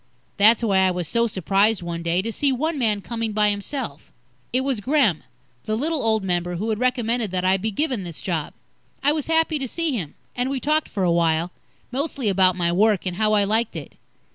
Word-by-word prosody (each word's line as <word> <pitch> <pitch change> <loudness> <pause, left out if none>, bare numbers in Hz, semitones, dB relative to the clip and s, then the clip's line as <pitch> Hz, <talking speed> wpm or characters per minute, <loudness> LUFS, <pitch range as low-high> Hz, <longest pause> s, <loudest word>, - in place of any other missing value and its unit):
That's 220 +3 +5
why 195 -4 +3
I 190 0 +4
was 180 -2 -3
so 235 +5 +1
surprised 195 +1 +1
one 170 -1 -4
day, 170 +2 0
to 230 - -3
see 280 +5 +1
one 305 +4 -1
man 215 -4 +1
coming 225 0 -3
by 210 0 +3
himself. 205 - -5 0.4
It 255 - +1
was 265 -5 -1
Gremm, 245 - +2 0.4
the 215 0 -1
little 310 +3 -1
old 220 -2 +1
member, 175 -1 -1
who 210 +6 -3
had 215 - -2
recommended 240 -3 0
that 185 0 -2
I 190 +1 +4
be 215 +4 -2
given 255 +1 -1
this 170 -3 -7
job. 165 -5 -3 0.5
I 290 - +4
was 305 -2 -2
happy 320 -1 +2
to 270 - -3
see 330 +3 -1
him, 170 -10 -5 0.2
and 245 +1 -1
we 270 -1 -1
talked 305 +4 0
for 195 - -2
a 175 - +3
while, 170 0 +1 0.4
mostly 270 -3 -1
about 185 -2 +3
my 170 -2 0
work, 205 +2 +2
and 180 -1 -3
how 215 +1 +2
I 205 -1 +4
liked 220 +3 0
it. - - -7
215 Hz, 220 wpm, -23 LUFS, 185-255 Hz, 0.5 s, That's